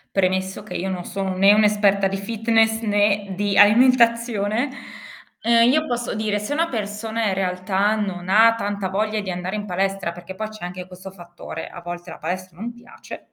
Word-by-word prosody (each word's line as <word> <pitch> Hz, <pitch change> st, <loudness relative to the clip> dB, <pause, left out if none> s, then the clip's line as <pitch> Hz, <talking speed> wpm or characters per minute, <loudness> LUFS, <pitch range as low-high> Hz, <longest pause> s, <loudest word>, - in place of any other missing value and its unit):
Premesso 190 Hz, +1 st, 0 dB
che 210 Hz, -, -9 dB
io 190 Hz, +2 st, -3 dB
non 180 Hz, -2 st, -4 dB
sono 195 Hz, -1 st, -3 dB
né 195 Hz, +2 st, +6 dB
un'esperta 205 Hz, -2 st, +3 dB
di 195 Hz, -, -3 dB
fitness 225 Hz, +2 st, +1 dB
né 205 Hz, -2 st, +1 dB
di 205 Hz, 0 st, 0 dB
alimentazione, 235 Hz, 0 st, +4 dB, 0.7 s
uhm, 235 Hz, +1 st, +5 dB
io 310 Hz, +3 st, +2 dB
posso 240 Hz, -2 st, -3 dB
dire 215 Hz, -1 st, -1 dB
se 210 Hz, +8 st, -3 dB
una 330 Hz, +2 st, +1 dB
persona 220 Hz, 0 st, -3 dB
in 190 Hz, -, 0 dB
realtà, 190 Hz, +2 st, 0 dB
non 185 Hz, -4 st, -4 dB
ha 225 Hz, +3 st, +6 dB
tanta 200 Hz, -3 st, -3 dB
voglia 215 Hz, +3 st, -1 dB
di 200 Hz, -2 st, -5 dB
andare 180 Hz, +3 st, -4 dB
in 205 Hz, 0 st, -5 dB
palestra, 195 Hz, -1 st, -2 dB
perché 175 Hz, +2 st, -10 dB
poi 215 Hz, +2 st, -4 dB
c'è 215 Hz, -4 st, -10 dB
anche 180 Hz, 0 st, -7 dB
questo 185 Hz, +1 st, -11 dB
fattore, 175 Hz, -3 st, -9 dB
a 175 Hz, -, -10 dB
volte 175 Hz, 0 st, -7 dB
la -, -, -9 dB
palestra 185 Hz, -1 st, -5 dB
non 235 Hz, +4 st, -5 dB
piace, 240 Hz, 0 st, -13 dB
205 Hz, 185 wpm, -22 LUFS, 190-220 Hz, 0.7 s, né